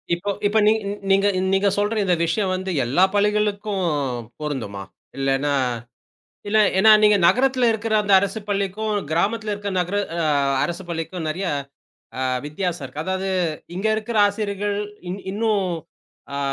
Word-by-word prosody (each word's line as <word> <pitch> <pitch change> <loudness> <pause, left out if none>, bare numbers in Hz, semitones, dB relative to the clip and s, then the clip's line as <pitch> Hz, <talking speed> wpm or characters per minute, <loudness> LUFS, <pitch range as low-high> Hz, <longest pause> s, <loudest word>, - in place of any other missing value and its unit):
இப்ப 195 +4 -5 0.2
இப்ப 210 +2 +1
நீங் 220 +1 +4 0.3
நீங்க 195 +1 +4 0.3
நீங்கச் 195 0 +2
சொல்ற 205 +2 0
இந்த 180 -2 +2
விஷியம் 185 +3 0
வந்து 185 0 -3
எல்லா 140 +10 +3
பள்ளிகளுக்கும் 210 -1 +1 0.6
பொருந்துமா? 115 -10 -4 0.4
இல்லனா 135 +1 +1 0.9
இல்ல 210 +1 +2 0.2
ஏனா, 220 +3 +6
நீங்க 210 -1 +6
நகரத்துல 255 +1 +3
இருக்குற 220 0 -2
அந்த 205 -1 +1
அரசுப் 200 +2 -4
பள்ளிக்கும், 200 +2 -1 0.2
கிராமத்துல 210 +5 0
இருக்க 205 0 -4
நகர 180 +3 -1 0.2
அ 165 - 0 0.4
அரசுப் 175 +1 -4
பள்ளிக்கும் 165 +1 -4
நிறைய 180 +6 -3 0.7
அ - - -1 0.2
வித்யாசம் 170 -1 -3
இருக்கு. 145 +4 -6
அதாவது 190 +1 -2 0.5
இங்க 195 +4 -1
இருக்குற 220 0 -2
ஆசிரியர்கள் 205 -1 -2 0.3
இன் 190 +2 -5
இன்னும் 210 -2 +1 0.7
அ - - -2
200 Hz, 140 wpm, -22 LUFS, 175-210 Hz, 0.9 s, ஏனா